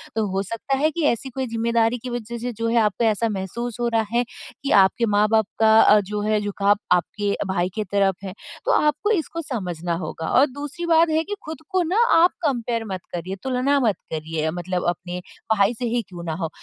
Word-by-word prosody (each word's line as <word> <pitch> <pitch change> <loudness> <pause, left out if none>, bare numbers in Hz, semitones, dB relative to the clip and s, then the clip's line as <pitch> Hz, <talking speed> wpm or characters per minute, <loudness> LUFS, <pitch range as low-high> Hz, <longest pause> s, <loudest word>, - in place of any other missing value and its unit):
तो 220 -1 +1
हो 195 +1 0
सकता 230 +6 -2
है 310 +3 +2
कि 335 +1 -3
ऐसी 265 +3 -5
कोई 260 0 -3
ज़िम्मेदारी 230 +1 +1
की 255 - -4
वजह 235 -1 -5
से 245 +2 -4
जो 230 +1 -2
है 235 - +1
आपको 210 +1 +1
ऐसा 220 +1 +1
महसूस 220 +5 -4
हो 240 - +1
रहा 225 - +3
है 240 +1 +3 0.4
कि 275 - -1
आपके 195 +5 +3
माँ-बाप 210 +1 +3
का 220 -1 +5
अ, 210 - +6
जो 205 +1 -3
है 215 0 +1
झुकाव 205 0 +2 0.2
आपके 200 +3 0
भाई 180 -1 0
की 215 - -1
तरफ 195 -1 +1
है 190 -1 -5 0.3
तो - - +2
आपको 300 +8 +2
इसको 335 -3 -1
समझना 180 - -3
होगा। 160 - -5
और 275 - +7
दूसरी 290 +5 -5
बात 330 0 +4
है 315 +1 +2
कि 410 +3 -5
खुद 315 -2 -6
को 375 -1 +1
ना 360 +6 -1 0.2
आप 345 +2 +6
कंपेयर 235 -4 -1
मत 190 -2 -4
करिए, 180 +2 -4
तुलना 265 +2 +1
मत 220 -7 +2 0.2
करिए 160 0 -2
मतलब 180 +1 -3
अपने 175 +1 -4 0.4
भाई 200 +3 +3
से 245 - -2
ही 235 +1 0
क्यों 175 -2 -8
ना 160 -2 -3
हो। 160 - -1
225 Hz, 215 wpm, -23 LUFS, 190-260 Hz, 0.4 s, और